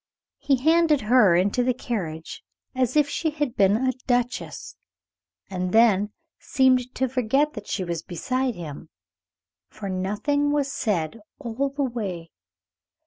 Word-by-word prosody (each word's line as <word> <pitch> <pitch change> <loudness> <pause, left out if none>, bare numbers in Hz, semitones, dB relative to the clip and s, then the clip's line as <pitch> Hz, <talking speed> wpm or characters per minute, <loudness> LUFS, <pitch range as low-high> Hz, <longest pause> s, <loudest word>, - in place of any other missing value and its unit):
He 280 - +2
handed 315 +2 +3
her 215 -5 +5
into 200 +7 +2
the 250 0 +1
carriage 170 -11 -5 0.3
as 255 0 0
if 300 -1 +4
she 320 +2 -1
had 295 -5 -3
been 200 +1 +4
a 260 +2 +1 0.2
duchess, 245 -1 -2 0.7
and 185 -1 -3
then 210 -3 +4 0.3
seemed 255 -1 +2
to 260 - +1
forget 265 +4 +1
that - - -8
she 190 - -2
was 170 -2 -3
beside 255 +9 -2
him; 155 -2 -8 0.8
for 205 -2 -7
nothing 210 +11 0
was 285 -2 0
said 195 - -2 0.2
all 250 +4 -2
the 280 +1 -2
way. 195 -10 -4
240 Hz, 140 wpm, -24 LUFS, 190-265 Hz, 0.8 s, her